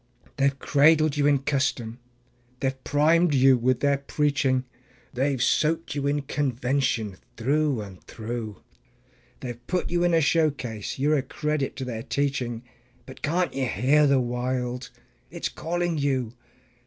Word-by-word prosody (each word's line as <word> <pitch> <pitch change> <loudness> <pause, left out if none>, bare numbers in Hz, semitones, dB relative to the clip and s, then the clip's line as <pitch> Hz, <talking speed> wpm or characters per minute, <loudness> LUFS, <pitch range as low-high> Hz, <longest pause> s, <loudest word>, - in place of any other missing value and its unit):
They 135 - +2
have 140 -1 +1
cradled 155 +3 +4
you 145 -1 +2
in 140 -2 +2
custom, 130 -5 -1 0.6
they 135 - +1
have 130 0 -10
primed 155 +2 +3
you 135 0 +6
with 125 +1 +1
their 140 -1 +2
preaching, 140 -2 0 0.5
They 135 +3 +1
have 130 -4 0
soaked 160 +2 +1
you 140 -1 -2
in 145 0 0
convention 130 -6 -1 0.2
through 140 +1 +1
and 95 -3 -10
through; 110 -2 -6 0.8
They 125 - -5
have 120 0 -9
put 180 -1 -1
you 175 0 +1
in 175 -1 +3
a - - +5
showcase; 145 -9 0
you're 150 +3 +2
a - - +1
credit 150 +1 -2
to 130 - -5
their 115 -3 -4
teaching 125 -3 -2 0.4
But 130 - -12
can't 175 +4 0
you 135 -1 -1
hear 140 +7 +3
the 140 -1 +4
Wild? 125 +1 -2 0.4
it's - - -4
calling 175 -1 -2
you. 130 -5 -1
135 Hz, 155 wpm, -25 LUFS, 125-150 Hz, 0.8 s, you